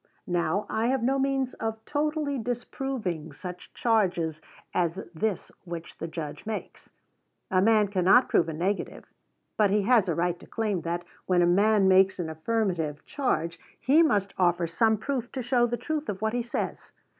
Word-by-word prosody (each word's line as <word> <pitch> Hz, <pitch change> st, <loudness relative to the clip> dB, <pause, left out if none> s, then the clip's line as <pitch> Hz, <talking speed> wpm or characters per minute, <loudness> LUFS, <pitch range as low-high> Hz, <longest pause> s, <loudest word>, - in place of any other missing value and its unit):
Now, 175 Hz, +2 st, 0 dB
I 220 Hz, +2 st, 0 dB
have 260 Hz, -1 st, +1 dB
no 270 Hz, +3 st, +2 dB
means 270 Hz, -1 st, 0 dB
of 220 Hz, 0 st, -4 dB
totally 300 Hz, -2 st, -1 dB
disproving 235 Hz, -, -3 dB
such 180 Hz, +3 st, -9 dB
charges 175 Hz, -9 st, +1 dB, 0.3 s
as 175 Hz, +1 st, 0 dB
this 195 Hz, +3 st, -2 dB
which 170 Hz, -2 st, -8 dB
the 165 Hz, -, -3 dB
Judge 160 Hz, -3 st, -6 dB
makes. 220 Hz, -1 st, -6 dB, 0.6 s
A 185 Hz, -1 st, +4 dB
man 215 Hz, 0 st, +4 dB
cannot 195 Hz, +5 st, +4 dB
prove 165 Hz, -, +2 dB
a -, -, -3 dB
negative; 185 Hz, +6 st, -2 dB, 0.5 s
but 210 Hz, -2 st, +4 dB
he 205 Hz, +1 st, +2 dB
has 220 Hz, -4 st, +4 dB
a 165 Hz, -, +1 dB
right 175 Hz, 0 st, 0 dB
to -, -, -14 dB
claim 210 Hz, -6 st, -1 dB
that, 170 Hz, +1 st, -3 dB, 0.2 s
when 180 Hz, -1 st, +4 dB
a -, -, +5 dB
man 200 Hz, +3 st, +4 dB
makes 190 Hz, 0 st, +5 dB
an 165 Hz, -3 st, -3 dB
affirmative 165 Hz, -4 st, -1 dB
charge, 170 Hz, -, -1 dB, 0.2 s
he 280 Hz, +7 st, +4 dB
must 205 Hz, -, +2 dB
offer 175 Hz, -1 st, +3 dB
some 220 Hz, +7 st, +2 dB
proof 245 Hz, +1 st, -3 dB
to 260 Hz, -, -3 dB
show 240 Hz, 0 st, +3 dB
the 240 Hz, 0 st, -2 dB
truth 310 Hz, +5 st, -3 dB
of 190 Hz, -, -3 dB
what 220 Hz, +2 st, -1 dB
he 245 Hz, -, 0 dB
says. 235 Hz, 0 st, -4 dB
205 Hz, 175 wpm, -27 LUFS, 175-240 Hz, 0.6 s, a